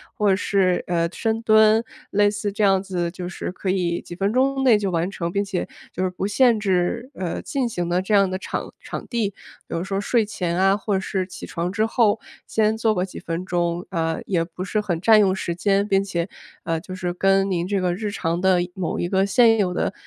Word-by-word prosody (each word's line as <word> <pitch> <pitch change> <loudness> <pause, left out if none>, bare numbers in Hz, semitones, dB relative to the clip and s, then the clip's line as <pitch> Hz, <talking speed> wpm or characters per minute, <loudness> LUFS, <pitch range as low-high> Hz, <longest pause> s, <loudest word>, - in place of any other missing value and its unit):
或 210 -1 +2
者 190 - +4
是， 190 -2 +1
呃， 170 -1 +1
深 225 0 -1
蹲， 220 0 +5 0.3
类 205 0 +3
似 205 0 -3
这 205 - -4
样 195 -1 +3
子 180 -3 -2
就 180 0 -6
是 180 - -5
可 185 - -4
以 180 -2 0
几 - - -10
分 195 +3 0
钟 270 +2 +2
内 235 -4 +6
就 200 -2 -2
完 170 +1 0
成， 170 -3 -4
并 200 +2 0
且 195 -2 -2 0.3
就 185 - -2
是 185 - +1
不 185 +2 -3
限 230 +1 +4
制， 200 +5 0
呃， 185 -7 -4
进 265 -4 -2
行 175 -6 -3
的 175 +1 +1
这 190 +3 -2
样 195 -2 +5
的 185 - -2
场 190 - -5
场 - - -7
地。 230 -4 0 0.4
比 - - -5
如 - - -2
说 195 0 -2
睡 225 +1 +2
前 180 -5 -2
啊 195 +1 +4
或 205 -1 -1
者 190 0 -2
起 180 - -9
床 170 +1 -3
之 215 +2 +1
后 225 -2 +2 0.3
先 220 0 +2
做 220 -1 +2
个 180 - 0
几 190 - -9
分 170 +1 -4
钟， 175 -1 -1
呃， 165 -2 -1
也 175 -4 +1
不 175 +2 -7
是 215 +2 0
很 180 -6 -2
占 220 +4 +6
用 190 -2 +3
时 175 -2 -3
间， 200 +3 +1
并 195 -1 +2
且， 175 -3 -2 0.4
呃， 165 -1 -1
就 185 +1 -9
是， 180 -1 -3
跟 195 +2 +2
您 175 -2 0
这 200 0 0
个 180 -1 0
日 210 +3 -3
常 170 -3 -2
的 190 -1 +4 0.2
某 180 -2 -3
一 175 - 0
个 190 +1 +2
现 225 +3 +5
有 195 -4 +1
的， 180 - -1
195 Hz, 250 characters per minute, -23 LUFS, 180-210 Hz, 0.4 s, 内